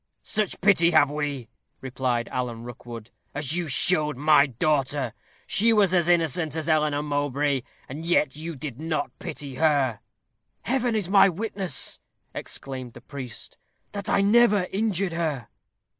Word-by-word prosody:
"Such 215 -3 -1
pity 175 -3 +5
have 155 -4 +4
we," 145 -5 -3 0.3
replied 125 -2 -2
Alan 120 -2 -4
Rookwood, 120 -1 -9 0.2
"as 145 +1 -1
you 175 -2 -2
showed 150 0 +2
my 150 0 +5
daughter. 135 -1 0 0.3
She 230 +3 +3
was 205 -4 +4
as 175 -1 +2
innocent 165 -2 +1
as 160 -1 -3
Eleanor 150 -2 +2
Mowbray, 145 -1 0 0.3
and 145 +5 -7
yet 165 -5 +1
you 160 +2 -6
did 135 -1 -7
not 155 -3 -2
pity 150 -7 -6
her." 140 -8 +2 0.6
"Heaven 245 -2 0
is 205 -5 0
my 195 +1 +6
witness," 190 -4 -2 0.3
exclaimed 130 -3 -6
the - - -12
priest, 130 -5 -8 0.3
"that 200 -1 -4
I - - +3
never 210 -1 +4
injured 195 -3 0
her." 155 -8 -2
150 Hz, 145 wpm, -25 LUFS, 135-180 Hz, 0.6 s, my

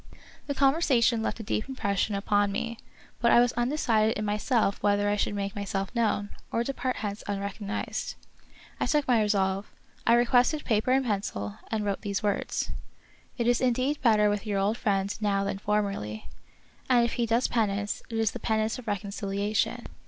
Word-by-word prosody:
The 285 - -2
conversation 270 -5 +3
left 225 - -2
a - - -5
deep 215 +4 -2
impression 200 -5 -1
upon 205 0 +1
me, 230 +3 -3 0.4
but 235 - +3
I - - +7
was 245 0 +3
undecided 235 -4 +1
in 210 - -2
myself 210 0 +1
whether 205 0 +2
I 205 - +2
should 205 0 -1
make 200 -1 -3
myself 195 0 -3
known, 215 -3 0 0.2
or 230 - +1
depart 255 0 -2
hence 205 0 -4
unrecognized. 200 +1 -3 0.6
I - - 0
took 295 -2 +1
my 240 -3 +4
resolve. 195 -1 0 0.4
I 230 - +7
requested 245 +5 +3
paper 220 +2 +1
and 265 0 +3
pencil, 100 - -3
and 215 -2 -1
wrote 200 -1 -1
these 200 -2 -2
words: 205 -1 -1 0.3
" - - -31
It 235 - 0
is 240 0 +3
indeed 255 +3 +1
better 215 -4 +4
with 205 +1 -1
your 205 -1 0
old 200 +3 +1
friend 200 -4 0
now 200 -2 +1
than 200 0 -3
formerly, 200 - -2 0.6
and 240 -2 +5
if 235 - -2
he 235 -1 0
does 230 +3 +2
penance 205 -3 -1
it 225 - -3
is 225 -2 +2
the 245 - -7
pen 220 0 +1
ance 220 +4 -1
of 245 - -12
reconciliation." 200 +1 -1
215 Hz, 180 wpm, -28 LUFS, 200-240 Hz, 0.6 s, I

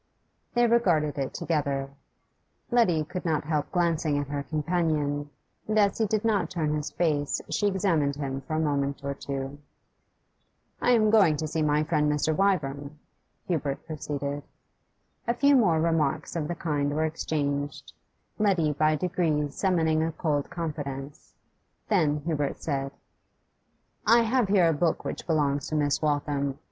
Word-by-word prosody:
They 240 0 +4
regarded 175 -12 +2
it 135 - -2
together. 140 -4 -1 0.8
Letty 185 -10 +3
could 180 +4 -6
not 160 -2 0
help 150 -1 -2
glancing 165 -4 +1
at 145 -1 -3
her 145 0 -2
companion, 150 -2 -1 0.4
and 215 0 0
as 200 0 +3
he 220 - +2
did 215 +1 -1
not 215 -3 +1
turn 155 -5 -1
his 150 -1 -2
face 150 -4 0
she 205 - +1
examined 170 -8 +1
him 135 -2 -4
for 155 +4 -4
a - - +1
moment 140 -2 -1
or 140 0 -2
two. 140 0 -5 1.2
'I - - +2
am 215 -2 +4
going 195 -9 +5
to 155 - -2
see 155 +1 -2
my 150 0 +2
friend 150 -2 +1
Mr. 150 +1 +1
Wyvern,' 150 -7 0 0.5
Hubert 145 -5 -2
proceeded. 145 -2 -4 0.9
A 235 - +1
few 280 +2 +4
more 180 -11 +4
remarks 160 -1 0
of 155 -3 -1
the 175 - -3
kind 145 -3 -1
were 155 +1 +1
exchanged, 145 -3 -3 0.5
Letty 185 -7 +2
by 155 +1 +2
degrees 155 -4 0
summoning 160 -5 +1
a 165 +1 0
cold 150 -3 -1
confidence; 145 -4 -6 0.5
then 155 -8 +2
Hubert 145 -2 -2
said 135 -3 -3 1.2
'I 230 +2 +7
have 235 0 +2
here 190 -3 +4
a 165 - +3
book 160 +2 0
which - - -5
belongs 145 -4 +1
to 155 - -3
Miss 145 -2 +1
Waltham. 145 -2 0
155 Hz, 155 wpm, -27 LUFS, 145-175 Hz, 1.2 s, I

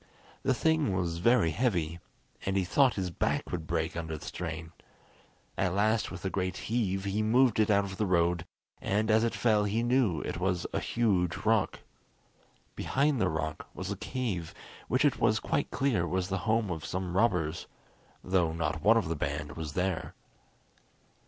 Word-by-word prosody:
The 130 - +1
thing 160 -9 +2
was 85 -2 -1
very 115 -4 +4
heavy, 85 -5 0 0.4
and 95 0 0
he 95 - +2
thought 130 +7 +3
his 95 -3 -2
back - - -1
would 80 -3 -4
break 80 -1 -1
under 80 -2 -4
the - - -11
strain. 80 -2 -5 0.9
At 95 -1 +1
last 110 +2 +2
with 90 0 -8
a - - +1
great 95 -1 -2
heave 100 -5 -1
he 100 +2 0
moved 115 +1 +3
it 110 - +3
out 100 -1 +4
of 95 -1 -6
the 105 - 0
road, 85 -1 +2 0.4
and 105 +2 +1
as 110 +1 +4
it 115 - 0
fell 110 -3 +3
he 110 +3 0
knew 120 - +2
it - - -4
was 90 -1 0
a - - +1
huge 95 -8 +1
rock. 110 -2 +2 0.9
Behind 140 -2 +1
the - - +3
rock 80 0 -3
was 95 +1 -4
a - - -1
cave 100 -7 -4 0.3
which 130 +3 +2
it 140 -3 +2
was 110 -1 +3
quite 145 - -1
clear 120 -12 +1
was 90 +2 -1
the 95 0 -1
home 110 -3 +2
of 80 -4 -4
some 90 -1 -3
robbers, 90 -7 +1 0.6
though 90 -3 +1
not 80 -1 -2
one 110 +5 +5
of 110 - 0
the 85 - -1
band 75 0 -3
was 80 -3 -5
there. 90 -2 -2
95 Hz, 180 wpm, -30 LUFS, 85-110 Hz, 0.9 s, one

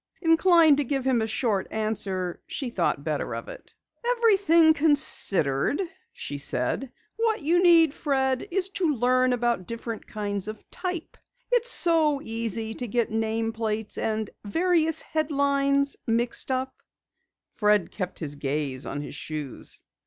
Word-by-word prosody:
Inclined 325 -2 +5
to 290 - +1
give 270 0 -2
him 255 -3 +2
a 220 - -1
short 220 -4 0
answer, 195 -5 -2
she 260 -5 -4
thought - - -1
better - - -3
of - - -7
it. - - -12 0.4
"Everything 375 -8 +5
considered," 280 - +2 0.3
she 145 0 -6
said, 140 - 0 0.3
"what 450 -6 0
you 340 +4 +3
need, 335 -4 +6
Fred, 265 -1 -1
is 385 +1 0
to 345 -6 0
learn 255 +1 +2
about 240 -6 0
different 230 -1 -6
kinds 205 -2 -4
of 215 0 -8
type. 360 -3 -5 0.3
It's 485 -1 +2
so 320 -8 +3
easy 225 -2 -3
to 245 - -4
get 235 +1 -1
name 225 0 -1
plates 220 -1 -3
and 220 -1 -1 0.2
various 325 - +2
headlines 280 -2 +1
mixed!" 235 +3 +1 1.0
Fred 210 -4 +2
kept 185 -3 -5
his 150 -4 -2
gaze 140 -2 -2
on 145 - -4
his - - -8
shoes. 150 -2 -4
245 Hz, 140 wpm, -26 LUFS, 210-315 Hz, 1.0 s, need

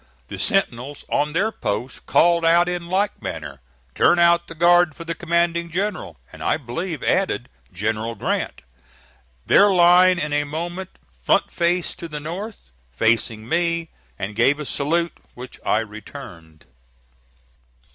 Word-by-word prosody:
The - - -7
sentinel 145 - 0
on 150 +1 0
their 200 +7 +1
post 110 - -4
called 170 0 +4
out 170 +1 +4
in 175 -1 -3
like 195 +3 -1
manner, 75 - -6 0.3
"Turn 175 - +4
out 170 0 +4
the 165 - -10
guard 175 -1 +4
for 170 - -8
the 170 0 -3
commanding 170 0 0
general," 180 - -3 0.2
and, - - -12
I - - +1
believe, 160 +5 -5
added, 185 -10 0 0.2
"General 110 +4 -2
Grant." - - -3 0.8
Their 205 - +6
line 180 0 +6
in 150 -2 -2
a 145 0 +2
moment 175 +5 -5 0.3
front - - +2
faced 175 +1 -1
to 170 - -6
the 150 -2 -6
north, 190 +8 -6 0.3
facing 110 - 0
me, 170 +1 0 0.3
and 100 +2 -5
gave 135 +6 +3
a 150 - -4
salute, 165 +5 0 0.2
which 125 0 -10
I 110 - +2
returned. 85 -7 -11
165 Hz, 145 wpm, -22 LUFS, 120-175 Hz, 0.8 s, Their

